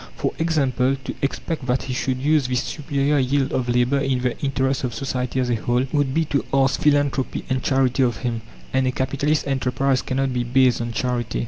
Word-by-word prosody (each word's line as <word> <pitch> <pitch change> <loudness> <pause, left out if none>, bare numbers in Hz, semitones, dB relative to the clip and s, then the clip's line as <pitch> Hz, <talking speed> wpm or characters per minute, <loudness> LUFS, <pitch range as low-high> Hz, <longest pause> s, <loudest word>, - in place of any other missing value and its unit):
For - - -1
example, 135 -5 +1
to - - -4
expect 140 0 -3
that 125 +1 +1
he 130 - -4
should 130 0 -1
use 145 0 +2
this 125 -1 0
superior 145 -1 0
yield 135 +1 +1
of 125 -1 -1
labour 125 +3 +2
in 135 -2 0
the 125 -1 0
interest 135 -1 0
of 125 -3 -2
society 130 -2 -2
as 125 -1 0
a - - +2
whole, 120 +3 0
would 145 -3 +2
be 160 +4 +1
to 140 -5 0
ask 135 -1 +2
philanthropy 145 -3 +1
and 130 0 +1
charity 130 -1 +2
of 120 -5 +2
him, 115 -2 -1 0.3
and 130 0 +2
a - - +2
capitalist 140 +3 0
enterprise 135 0 +1
cannot 135 0 -1
be 125 -1 0
based 125 0 +3
on 120 0 -3
charity. 120 0 -2
130 Hz, 205 wpm, -22 LUFS, 125-140 Hz, 0.3 s, based